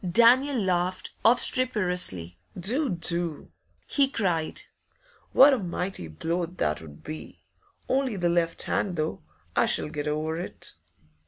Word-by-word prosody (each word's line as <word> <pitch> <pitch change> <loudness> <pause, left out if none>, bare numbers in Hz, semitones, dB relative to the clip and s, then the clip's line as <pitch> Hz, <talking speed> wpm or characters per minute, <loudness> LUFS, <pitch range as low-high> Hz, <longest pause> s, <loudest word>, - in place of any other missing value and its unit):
Daniel 250 +8 +5
laughed 185 -1 -1
obstreperously. 180 - +2 0.2
'Do! 250 - 0
do!' 170 -3 -1 0.3
he 280 -2 +2
cried. 175 - -1 0.7
'What 280 +1 +7
a 260 - +1
mighty 180 - -4
blow 165 - -2
that 75 - -2
'ud 75 -2 -13
be! 155 +1 -9 0.4
Only 265 -4 0
the 175 -2 0
left 170 -1 0
hand, 190 -3 -1
though. 155 - -3 0.3
I - - +3
shall - - +2
get 150 0 -4
over 155 +2 -2
it. 175 - -7
175 Hz, 130 wpm, -26 LUFS, 155-225 Hz, 0.7 s, What